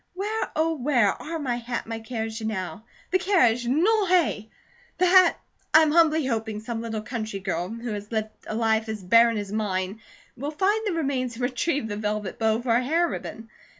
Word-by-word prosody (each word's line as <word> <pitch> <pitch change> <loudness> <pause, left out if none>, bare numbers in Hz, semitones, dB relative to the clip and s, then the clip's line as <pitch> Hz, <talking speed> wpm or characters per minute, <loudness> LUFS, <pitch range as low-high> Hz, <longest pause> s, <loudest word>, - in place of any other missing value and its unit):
Where, 420 +4 -2
oh, 325 +1 +2
where 245 -6 +3
are 325 +10 -4
my 260 -6 -2
hat 240 0 -4
and 230 - -11
my 225 - -3
carriage 225 -1 -5
now? 210 0 -4 0.3
The 375 - +3
carriage, 245 - +3
non 375 - +2
est! 310 - +2 0.5
The 365 - +3
hat 365 -1 +6 0.4
I 315 - +9
am 305 - +2
humbly 320 -2 +4
hoping 220 -4 -2
some 225 +1 -5
little 220 -2 -4
country 215 -3 -4
girl, 185 -2 -3
who 230 0 -5
has 205 +1 -7
lived 220 -1 -1 0.2
a 215 - -4
life 220 -1 +1
as 215 -3 -5
barren 230 +4 +5
as 205 -1 -4
mine, 200 -1 -2 0.3
will 280 +4 -4
find 405 +7 0
the 390 - 0
remains 270 -6 -1
and 245 - -5
retrieve 255 +1 0
the 205 -1 -4
velvet 210 -2 -3
bow 220 0 +2
for 240 -2 +1
a 245 - +2
hair 330 +6 +2
ribbon. 225 -7 -7
235 Hz, 200 wpm, -25 LUFS, 220-315 Hz, 0.5 s, I